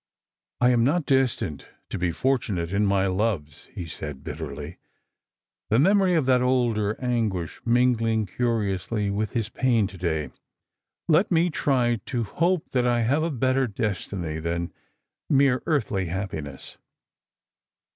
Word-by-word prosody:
" -, -, -49 dB
I 125 Hz, 0 st, +5 dB
am 120 Hz, -2 st, +3 dB
not 150 Hz, +5 st, +2 dB
destined 130 Hz, -, 0 dB, 0.2 s
to -, -, -4 dB
be 90 Hz, 0 st, +1 dB
fortunate 100 Hz, -6 st, -1 dB
in 100 Hz, +1 st, +2 dB
my 100 Hz, -1 st, +2 dB
loves," 95 Hz, -6 st, -1 dB
he 90 Hz, -, -6 dB
said 75 Hz, -3 st, -6 dB
bitterly, 75 Hz, +1 st, -6 dB, 0.9 s
the 110 Hz, -, +3 dB
memory 190 Hz, +4 st, +4 dB
of 155 Hz, -5 st, +2 dB
that 125 Hz, -1 st, +4 dB
older 120 Hz, -5 st, +1 dB
anguish 110 Hz, -9 st, -2 dB
mingling 115 Hz, -2 st, +2 dB
curiously 105 Hz, -2 st, -1 dB
with 105 Hz, +1 st, -2 dB
his 115 Hz, -4 st, -1 dB
pain 120 Hz, -5 st, +2 dB
to 95 Hz, -1 st, -8 dB
day; 80 Hz, -4 st, -1 dB, 0.4 s
" -, -, -61 dB, 0.3 s
let 165 Hz, +5 st, +4 dB
me 170 Hz, 0 st, +2 dB
try 125 Hz, -5 st, +1 dB
to 120 Hz, -3 st, -1 dB
hope 170 Hz, -, 0 dB
that 125 Hz, -1 st, +2 dB
I 120 Hz, -1 st, +2 dB
have 135 Hz, +7 st, +2 dB
a 165 Hz, -, 0 dB
better 130 Hz, -1 st, +1 dB
destiny 95 Hz, -6 st, -3 dB
than 85 Hz, +1 st, -3 dB, 0.6 s
mere 135 Hz, -2 st, +4 dB
earthly 105 Hz, -, 0 dB
happiness." 80 Hz, -6 st, -5 dB
115 Hz, 145 wpm, -25 LUFS, 95-130 Hz, 0.9 s, I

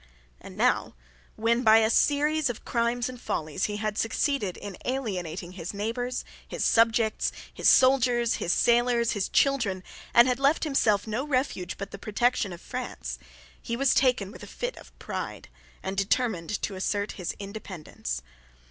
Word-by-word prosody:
And -, -, -12 dB
now -, -, +1 dB, 0.4 s
when, 230 Hz, +2 st, +2 dB
by 220 Hz, -2 st, +7 dB
a 220 Hz, 0 st, +4 dB
series 295 Hz, +2 st, +2 dB
of 240 Hz, -, -6 dB
crimes 235 Hz, 0 st, 0 dB
and 250 Hz, -1 st, -8 dB
follies, 155 Hz, +3 st, -2 dB
he 210 Hz, 0 st, -3 dB
had 215 Hz, 0 st, -2 dB
succeeded 225 Hz, -3 st, 0 dB
in 200 Hz, -2 st, -7 dB
alienating 185 Hz, -9 st, -3 dB
his 180 Hz, +1 st, -6 dB
neighbours, 245 Hz, +4 st, -3 dB, 0.2 s
his -, -, -2 dB
subjects, 225 Hz, -1 st, +3 dB, 0.2 s
his -, -, +3 dB
soldiers, 250 Hz, -3 st, +4 dB
his 170 Hz, -, -1 dB
sailors, 235 Hz, +1 st, +3 dB
his 205 Hz, -3 st, -1 dB
children, 230 Hz, -10 st, +2 dB, 0.3 s
and 235 Hz, +1 st, +7 dB
had 250 Hz, 0 st, 0 dB
left 280 Hz, +3 st, +3 dB
himself 220 Hz, -9 st, +2 dB
no 225 Hz, +4 st, -2 dB
refuge 255 Hz, -10 st, -1 dB
but 200 Hz, 0 st, -6 dB
the 200 Hz, -, -8 dB
protection 220 Hz, -1 st, 0 dB
of 175 Hz, -, -9 dB
France, -, -, -5 dB, 0.4 s
he 235 Hz, -, -3 dB
was 275 Hz, 0 st, +3 dB
taken 250 Hz, -7 st, +2 dB
with -, -, -12 dB
a -, -, -9 dB
fit -, -, -4 dB
of -, -, -15 dB
pride, -, -, -6 dB, 0.3 s
and 190 Hz, +1 st, -4 dB
determined 200 Hz, -3 st, 0 dB
to 205 Hz, -, -1 dB
assert 200 Hz, +2 st, -1 dB
his 180 Hz, -3 st, -4 dB
independence. 185 Hz, -, -6 dB
225 Hz, 160 wpm, -27 LUFS, 195-250 Hz, 0.4 s, by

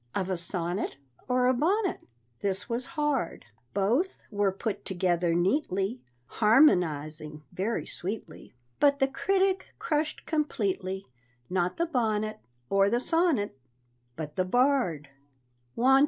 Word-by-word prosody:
Of 190 Hz, -1 st, -1 dB
a -, -, +1 dB
sonnet 170 Hz, -1 st, -3 dB, 0.3 s
Or 250 Hz, 0 st, +2 dB
a 255 Hz, -, +5 dB
bonnet? 370 Hz, -, +1 dB, 0.4 s
This 195 Hz, 0 st, -2 dB
was 240 Hz, +2 st, -2 dB
hard. 290 Hz, -, 0 dB, 0.3 s
Both 240 Hz, -, +1 dB
were 205 Hz, -1 st, +2 dB
put 200 Hz, +2 st, -4 dB
together 175 Hz, -2 st, +1 dB
neatly, 195 Hz, -, +1 dB, 0.2 s
Harmonizing 155 Hz, -, +3 dB
very 200 Hz, +6 st, -1 dB
sweetly, 195 Hz, -, -6 dB, 0.2 s
But 285 Hz, -1 st, +5 dB
the 270 Hz, -1 st, +3 dB
critic 380 Hz, +7 st, 0 dB
crushed 305 Hz, -1 st, -1 dB
completely 200 Hz, -, -1 dB, 0.5 s
Not 180 Hz, -1 st, 0 dB
the 340 Hz, -, +2 dB
bonnet, 215 Hz, -8 st, 0 dB, 0.3 s
Or 195 Hz, +4 st, +4 dB
the 240 Hz, +3 st, +2 dB
sonnet, 325 Hz, -, +1 dB, 0.6 s
But 150 Hz, -2 st, -6 dB
the 185 Hz, -, +3 dB
bard. 240 Hz, -, +2 dB
205 Hz, 115 wpm, -28 LUFS, 185-275 Hz, 0.6 s, a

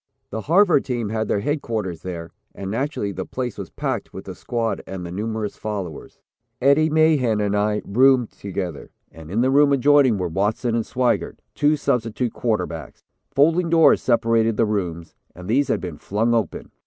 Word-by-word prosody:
The 110 Hz, -, -3 dB
Harvard 175 Hz, -, +4 dB
team 120 Hz, -5 st, -3 dB
had 110 Hz, 0 st, -2 dB
their 100 Hz, -, 0 dB
headquarters 110 Hz, -, -3 dB
there, 85 Hz, -2 st, -6 dB, 0.2 s
and 95 Hz, 0 st, -5 dB
naturally 115 Hz, -3 st, -2 dB
the 95 Hz, -1 st, -4 dB
place 125 Hz, +3 st, -4 dB
was -, -, -7 dB
packed -, -, -3 dB
with -, -, -9 dB
the -, -, -6 dB
squad 115 Hz, -2 st, -2 dB
and 95 Hz, -2 st, -6 dB
the 85 Hz, -, -7 dB
numerous 110 Hz, +2 st, -3 dB
followers. 100 Hz, -7 st, -6 dB, 0.4 s
Eddie 140 Hz, +4 st, +4 dB
Mahan 150 Hz, -8 st, +3 dB
and 105 Hz, -1 st, 0 dB
I 105 Hz, +1 st, 0 dB
roomed 125 Hz, +2 st, +4 dB
together, 90 Hz, -6 st, -6 dB, 0.2 s
and 80 Hz, -1 st, -12 dB
in 105 Hz, +6 st, 0 dB
the 130 Hz, +1 st, +2 dB
room 145 Hz, +1 st, +5 dB
adjoining 140 Hz, -3 st, +4 dB
were 90 Hz, -2 st, -1 dB
Watson 105 Hz, +7 st, -1 dB
and 115 Hz, -1 st, +1 dB
Swigert, 125 Hz, -1 st, 0 dB, 0.2 s
two 150 Hz, +1 st, +2 dB
substitute 120 Hz, -2 st, -1 dB
quarterbacks. 115 Hz, -3 st, -3 dB, 0.3 s
Folding 165 Hz, +5 st, +3 dB
doors 165 Hz, -1 st, +5 dB
separated 115 Hz, -2 st, +2 dB
the 115 Hz, -, +3 dB
rooms, 90 Hz, -6 st, -3 dB, 0.2 s
and 90 Hz, 0 st, -10 dB
these 135 Hz, +6 st, +2 dB
had -, -, 0 dB
been 85 Hz, -5 st, -6 dB
flung 110 Hz, +4 st, 0 dB
open. 110 Hz, -7 st, -2 dB
115 Hz, 175 wpm, -22 LUFS, 100-130 Hz, 0.4 s, room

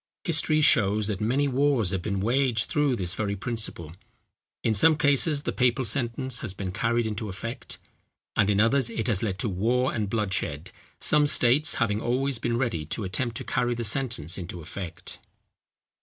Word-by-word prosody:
History 155 Hz, -1 st, +1 dB
shows 110 Hz, -7 st, +3 dB
that 100 Hz, -2 st, -3 dB
many 130 Hz, +7 st, +1 dB
wars 135 Hz, -6 st, +1 dB
have 95 Hz, -3 st, -2 dB
been 100 Hz, 0 st, -3 dB
waged 120 Hz, 0 st, +1 dB
through 145 Hz, -4 st, +1 dB
this 90 Hz, -5 st, -2 dB
very 100 Hz, -2 st, -2 dB
principle. 100 Hz, -7 st, -4 dB, 0.7 s
In 110 Hz, -, +1 dB
some 155 Hz, +9 st, +4 dB
cases 145 Hz, 0 st, +2 dB
the -, -, -2 dB
papal 125 Hz, 0 st, +1 dB
sentence 125 Hz, +2 st, +1 dB
has 100 Hz, -5 st, -6 dB
been 95 Hz, -2 st, -5 dB
carried 115 Hz, +3 st, 0 dB
into 110 Hz, 0 st, -4 dB
effect, 115 Hz, +7 st, -7 dB, 0.6 s
and 100 Hz, -1 st, +2 dB
in 100 Hz, -1 st, +2 dB
others 115 Hz, +3 st, +3 dB
it 115 Hz, -1 st, -4 dB
has 105 Hz, -6 st, +1 dB
led 100 Hz, -4 st, -2 dB
to 115 Hz, -, -2 dB
war 120 Hz, +7 st, 0 dB
and 105 Hz, -3 st, -2 dB
bloodshed, 95 Hz, -7 st, -3 dB, 0.3 s
some 150 Hz, -1 st, +3 dB
states 145 Hz, +2 st, +5 dB
having 105 Hz, -3 st, 0 dB
always 130 Hz, +1 st, -1 dB
been 120 Hz, 0 st, -1 dB
ready 115 Hz, -11 st, -1 dB
to 105 Hz, -, -2 dB
attempt 115 Hz, +5 st, -2 dB
to -, -, -5 dB
carry 120 Hz, -1 st, -1 dB
the 120 Hz, -, -4 dB
sentence 110 Hz, -, 0 dB
into 90 Hz, 0 st, -7 dB
effect. 85 Hz, +2 st, -8 dB
115 Hz, 175 wpm, -26 LUFS, 100-130 Hz, 0.7 s, states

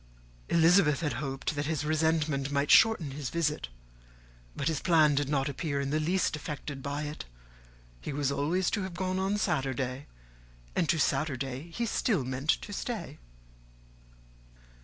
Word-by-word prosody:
Elizabeth 165 Hz, -3 st, +4 dB
had 150 Hz, -3 st, -1 dB
hoped 135 Hz, +1 st, -3 dB
that 145 Hz, 0 st, -2 dB
his 155 Hz, -2 st, -1 dB
resentment 155 Hz, -3 st, +1 dB
might 145 Hz, 0 st, +1 dB
shorten 220 Hz, -10 st, +5 dB
his 135 Hz, -2 st, -4 dB
visit, 155 Hz, -, -1 dB, 0.9 s
but 140 Hz, -, -2 dB
his 160 Hz, -4 st, 0 dB
plan 160 Hz, -4 st, +4 dB
did 140 Hz, -1 st, 0 dB
not 135 Hz, -1 st, +1 dB
appear 140 Hz, 0 st, -2 dB
in 140 Hz, 0 st, -2 dB
the 155 Hz, -, +1 dB
least 175 Hz, +2 st, +1 dB
affected 145 Hz, -1 st, -6 dB
by 145 Hz, +2 st, -3 dB
it. 150 Hz, +1 st, -6 dB, 0.7 s
He -, -, -5 dB
was 140 Hz, -1 st, 0 dB
always 165 Hz, +7 st, 0 dB
to 205 Hz, -, 0 dB
have 190 Hz, -2 st, -5 dB
gone 185 Hz, +1 st, -1 dB
on 195 Hz, +2 st, 0 dB
Saturday, 135 Hz, -, -1 dB, 0.7 s
and 160 Hz, -, +1 dB
to 165 Hz, -, +3 dB
Saturday 135 Hz, 0 st, -1 dB
he 235 Hz, +8 st, -2 dB
still 215 Hz, -, +1 dB
meant 130 Hz, +4 st, -5 dB
to 205 Hz, -, +1 dB
stay. 180 Hz, -, -5 dB
150 Hz, 155 wpm, -29 LUFS, 140-170 Hz, 0.9 s, shorten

